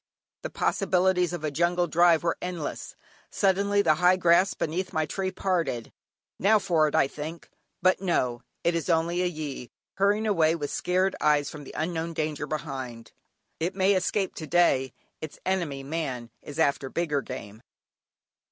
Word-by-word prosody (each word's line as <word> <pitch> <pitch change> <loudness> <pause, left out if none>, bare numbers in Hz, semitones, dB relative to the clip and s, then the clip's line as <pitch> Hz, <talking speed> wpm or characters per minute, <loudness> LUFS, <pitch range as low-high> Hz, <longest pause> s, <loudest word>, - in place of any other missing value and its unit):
The - - -4
possibilities 180 -1 +1
of 175 -3 -5
a 155 - -1
jungle 175 +4 +1
drive 170 0 +4
are 170 - +1
endless. 175 -5 -5 0.3
Suddenly 200 +1 +2
the 155 - +5
high 180 +1 +6
grass 180 +1 +3
beneath 180 +4 -3
my 155 0 +1
tree 190 +5 -2
parted, 175 - -2 0.5
"Now 215 +3 +5
for 170 -6 +2
it," 150 - -2
I - - +4
think. 155 +4 -8 0.3
But 185 0 +3
no! 125 -10 0 0.2
it 170 - +2
is 170 +1 -2
only 170 +1 +1
a 180 - +1
gyee, 150 -7 -6 0.3
hurrying 205 +3 +2
away 165 -6 +3
with 145 -3 -4
scared 185 +2 +1
eyes 150 -1 +2
from 150 -2 -9
the - - -11
unknown 165 0 -2
danger 155 -2 -2
behind. 130 -7 -5 0.5
It 175 +4 -2
may 195 +1 +3
escape 190 +1 0
to 155 - -6
day; 140 -6 +3 0.3
its 155 - -7
enemy, 170 -8 -1
man, 135 -6 -4
is 145 - -9
after 140 -4 +1
bigger 150 -3 -1
game. 110 -5 -8
165 Hz, 160 wpm, -27 LUFS, 150-185 Hz, 0.5 s, high